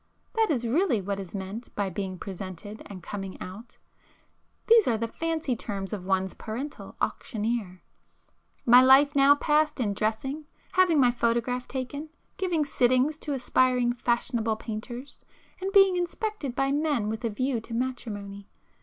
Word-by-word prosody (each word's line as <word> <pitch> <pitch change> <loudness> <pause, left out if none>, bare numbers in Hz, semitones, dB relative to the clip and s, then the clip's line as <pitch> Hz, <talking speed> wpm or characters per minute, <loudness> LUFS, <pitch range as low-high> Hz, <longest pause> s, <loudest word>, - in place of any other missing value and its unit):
That 450 -3 +2
is 240 -6 0
really 275 - +2
what 200 +1 -3
is 195 0 -7
meant 200 +5 -6
by 200 -2 -1
being 190 0 -4
'presented' 195 +2 -7
and 185 -4 -9
'coming 195 0 -6
out,'—these 235 - -2
are 230 -3 +2
the 230 +1 -2
fancy 320 0 -2
terms 200 -3 -5
of 190 -4 -5
one's 190 -1 +1
parental 255 +7 -6
auctioneer. 215 -5 -2 0.8
My 245 +1 +8
life 265 +2 +7
was 295 - -26
now 280 +1 +7
passed 300 0 +2
in 210 -5 0
dressing, 265 +9 -2 0.2
having 365 -4 +4
my 250 -2 +5
photograph 240 +1 0
taken, 280 +4 -5 0.3
giving 345 -5 0
'sittings' 255 +3 +2
to 295 - -3
aspiring 250 -1 +2
fashionable 235 -2 0
painters, 240 +5 -7 0.4
and 385 +1 -2
being 390 -2 +6
'inspected' 355 - -3
by 270 +1 +1
men 290 -7 +1
with 220 +3 -3
a 230 - +1
view 255 +3 -1
to 230 - -9
matrimony. 205 -5 -4
245 Hz, 150 wpm, -27 LUFS, 210-285 Hz, 0.8 s, My